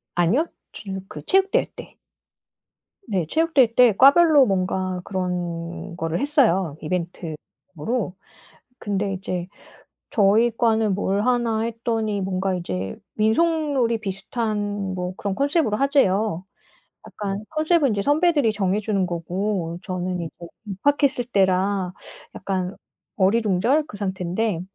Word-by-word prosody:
아니요? 190 Hz, -, +3 dB, 0.3 s
쥬 195 Hz, -2 st, -6 dB
그 150 Hz, -, -8 dB
체육대회 385 Hz, +1 st, +3 dB
때. -, -, -11 dB, 1.1 s
네 185 Hz, -5 st, 0 dB
체육대회 290 Hz, -, +3 dB
때 240 Hz, -5 st, +6 dB
과별로 285 Hz, 0 st, +7 dB
뭔가 185 Hz, -2 st, -1 dB
그런 175 Hz, -2 st, -4 dB
거를 165 Hz, +1 st, -2 dB
했어요 195 Hz, -, +2 dB
이벤트용으로. 180 Hz, +4 st, -4 dB, 0.6 s
근데 200 Hz, -1 st, -2 dB
이제 185 Hz, -2 st, -4 dB, 0.6 s
저희 220 Hz, +2 st, +4 dB
과는 220 Hz, -3 st, +2 dB
뭘 200 Hz, 0 st, 0 dB
하나 235 Hz, -3 st, +1 dB
했더니 225 Hz, -2 st, -2 dB
뭔가 190 Hz, 0 st, -1 dB
이제 95 Hz, -, -4 dB, 0.2 s
민속놀이 265 Hz, 0 st, +2 dB
비슷한 205 Hz, -1 st, -3 dB
뭐 180 Hz, 0 st, -3 dB
그런 200 Hz, -1 st, -3 dB
컨셉로 280 Hz, -, +1 dB
하재요. 215 Hz, -, +2 dB, 0.6 s
약간 200 Hz, 0 st, -4 dB
컨셉은 310 Hz, -4 st, +2 dB
선배들이 290 Hz, -, +3 dB
정해주는 200 Hz, 0 st, 0 dB
거고 175 Hz, 0 st, -3 dB
저는 180 Hz, -1 st, -3 dB
이제 165 Hz, -, -4 dB
뭐 170 Hz, -, -9 dB, 0.2 s
입학했을 265 Hz, +5 st, +1 dB
때라 190 Hz, -3 st, +1 dB, 0.4 s
약간 185 Hz, 0 st, -3 dB, 0.4 s
어리둥절 220 Hz, +7 st, +2 dB
그 205 Hz, -, -9 dB
상태인데. 190 Hz, 0 st, -2 dB
200 Hz, 255 characters per minute, -23 LUFS, 185-235 Hz, 1.1 s, 과별로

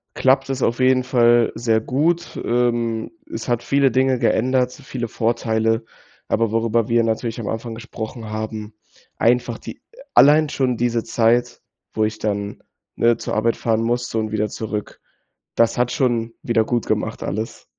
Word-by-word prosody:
klappt 135 Hz, +1 st, +2 dB
es 135 Hz, -1 st, -2 dB
auf 120 Hz, -, +1 dB
jeden 130 Hz, 0 st, +4 dB
Fall 120 Hz, -2 st, +4 dB
sehr 110 Hz, -1 st, +1 dB
gut. 165 Hz, +8 st, 0 dB
Ähm, 120 Hz, -1 st, 0 dB, 0.2 s
es -, -, -5 dB
hat 120 Hz, -1 st, +1 dB
viele 140 Hz, -1 st, +3 dB
Dinge 130 Hz, +1 st, +2 dB
geändert, 125 Hz, +2 st, +1 dB
viele 130 Hz, -4 st, -6 dB
Vorteile. 115 Hz, 0 st, 0 dB, 0.4 s
Aber 115 Hz, -1 st, +1 dB
worüber 115 Hz, 0 st, +1 dB
wir 115 Hz, 0 st, +3 dB
natürlich 115 Hz, +1 st, -2 dB
am 110 Hz, -, -5 dB
Anfang 115 Hz, 0 st, -4 dB
gesprochen 110 Hz, -1 st, -7 dB
haben, 110 Hz, 0 st, -5 dB, 0.4 s
einfach 120 Hz, +1 st, +1 dB
die -, -, -9 dB, 0.4 s
allein 150 Hz, +1 st, +6 dB
schon 130 Hz, -4 st, 0 dB
diese 120 Hz, -1 st, 0 dB
Zeit, 120 Hz, +1 st, +1 dB, 0.3 s
wo 110 Hz, -, +1 dB
ich 110 Hz, 0 st, -3 dB
dann, 100 Hz, -1 st, -3 dB, 0.3 s
ne, 115 Hz, -1 st, +3 dB
zur -, -, -4 dB
Arbeit 115 Hz, +2 st, +1 dB
fahren 115 Hz, -1 st, 0 dB
musste 120 Hz, 0 st, -1 dB
und 110 Hz, -1 st, -3 dB
wieder 105 Hz, 0 st, 0 dB
zurück. 105 Hz, -1 st, -5 dB, 0.6 s
Das 115 Hz, -1 st, +2 dB
hat 125 Hz, 0 st, +1 dB
schon 120 Hz, -2 st, 0 dB
wiedergutgemacht 115 Hz, 0 st, 0 dB
alles. 110 Hz, +3 st, -4 dB
115 Hz, 150 wpm, -21 LUFS, 110-125 Hz, 0.6 s, allein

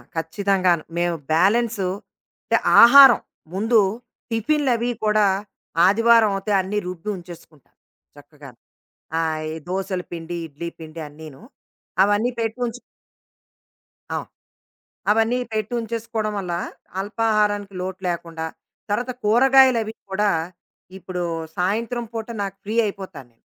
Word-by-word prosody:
ఖచ్చితంగాను. 180 Hz, 0 st, +1 dB
మేము 175 Hz, 0 st, +1 dB, 0.2 s
బ్యాలెన్సు 205 Hz, +3 st, +2 dB, 0.6 s
అంటే -, -, +3 dB, 0.2 s
ఆహారం 265 Hz, +1 st, +9 dB, 0.3 s
ముందు 220 Hz, +4 st, +3 dB, 0.5 s
టిఫిన్లవి 245 Hz, 0 st, +1 dB
కూడా 210 Hz, 0 st, +3 dB, 0.6 s
ఆదివారం 230 Hz, +1 st, +5 dB
అవుతే 195 Hz, +2 st, -3 dB
అన్ని 195 Hz, +3 st, -3 dB
రుబ్బి 180 Hz, +2 st, -6 dB
ఉంచేసుకుంటాం 170 Hz, -4 st, -14 dB, 0.4 s
చక్కగాను. 145 Hz, -3 st, -14 dB, 0.6 s
ఆహ్, 160 Hz, -1 st, -1 dB
ఈ -, -, -6 dB
దోసలు 185 Hz, 0 st, -2 dB
పిండి, 170 Hz, 0 st, -5 dB
ఇడ్లీ 160 Hz, +3 st, -7 dB
పిండి 160 Hz, +1 st, -9 dB
అన్నీను. 150 Hz, -1 st, -12 dB, 0.6 s
అవన్నీ 205 Hz, +4 st, +2 dB
పెట్టుంచు 235 Hz, +2 st, -3 dB, 1.4 s
అవును. -, -, -4 dB, 0.8 s
అవన్నీ 225 Hz, +3 st, +2 dB, 0.2 s
పెట్టుంచేసుకోవడం 225 Hz, 0 st, -3 dB
వల్ల 180 Hz, -3 st, -4 dB, 0.5 s
అల్పాహారానికి 210 Hz, -1 st, 0 dB
లోటు 185 Hz, 0 st, -5 dB
లేకుండా, 165 Hz, -1 st, -4 dB, 0.4 s
తర్వాత 240 Hz, +5 st, -1 dB
కూరగాయలవి 240 Hz, 0 st, +5 dB, 0.2 s
కూడా 205 Hz, +2 st, +2 dB, 0.7 s
ఇప్పుడు 185 Hz, -1 st, -5 dB, 0.4 s
సాయంత్రం 230 Hz, +6 st, -1 dB
పూట 225 Hz, -1 st, -4 dB, 0.2 s
నాకు 195 Hz, 0 st, -6 dB
ఫ్రీ 215 Hz, +2 st, -4 dB
అయిపోతా 190 Hz, -5 st, -6 dB
నేను. 115 Hz, -1 st, -37 dB
205 Hz, 100 wpm, -22 LUFS, 175-230 Hz, 1.4 s, ఆహారం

